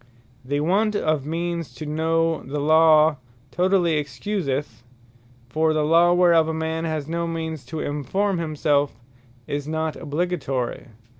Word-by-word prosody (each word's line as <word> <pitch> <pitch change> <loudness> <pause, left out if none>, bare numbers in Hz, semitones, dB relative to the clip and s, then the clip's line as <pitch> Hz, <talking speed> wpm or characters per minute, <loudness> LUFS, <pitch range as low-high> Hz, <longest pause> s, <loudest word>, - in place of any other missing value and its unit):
The 145 +3 -1
want 205 +7 +1
of 155 -7 0
means 170 -4 -3
to 155 - -7
know 160 +1 0
the 145 +3 -5
Law, 155 0 +5 0.3
totally 175 0 +2
Excuseth: 140 - -4 0.7
For 155 +4 +1
the 155 -1 +1
Law 170 +3 +5
whereof 170 -3 +4
a 160 - -2
man 160 +1 -2
has 155 -3 -3
no 170 +1 -2
means 160 -3 -4
to 160 -1 -5
enforme 180 +7 -1
himself, 150 -3 0 0.5
is 145 +2 -4
not 160 0 -2
obligatory. 145 -7 -3
160 Hz, 135 wpm, -23 LUFS, 145-170 Hz, 0.7 s, Law